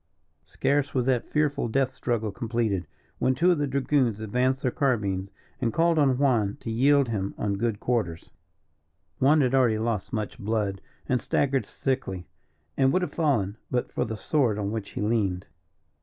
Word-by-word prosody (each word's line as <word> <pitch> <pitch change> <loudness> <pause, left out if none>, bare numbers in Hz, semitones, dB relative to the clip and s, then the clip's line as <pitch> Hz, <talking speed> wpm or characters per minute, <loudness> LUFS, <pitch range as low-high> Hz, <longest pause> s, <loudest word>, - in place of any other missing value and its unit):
Scarce 145 0 0
was 125 -2 +1
that 125 -2 0
fearful 150 -3 +1
death 130 +3 +1
struggle 115 -5 -2
completed, 110 -4 -1 0.3
when 130 - +2
two 175 +7 +4
of 170 - +1
the 145 - 0
dragoons 135 -4 +1
advanced 125 +5 0
their 125 - +1
carbines 100 -9 0 0.3
and 115 -3 +1
called 165 +2 +2
on 135 -3 +3
Juan 120 -8 +2
to 115 - -4
yield 135 +3 +3
him 100 -3 -2
on 105 -1 -1
good 110 0 -1
quarters. 105 -10 -2 0.9
Juan 145 +3 +5
had 130 -1 +1
already 125 -5 +4
lost 110 -2 -2
much 110 -2 -4
blood, 105 -2 -1 0.3
and 125 -2 +1
staggered 135 -2 0
sickly, 110 -10 -3 0.5
and 135 -1 +3
would 185 +4 +1
have - - -4
fallen 115 - 0
but 125 -1 -1
for - - -1
the 110 0 -4
sword 125 -5 +1
on 100 -1 -2
which 110 -3 -4
he - - -5
leaned. 105 -4 0
120 Hz, 170 wpm, -26 LUFS, 105-135 Hz, 0.9 s, Juan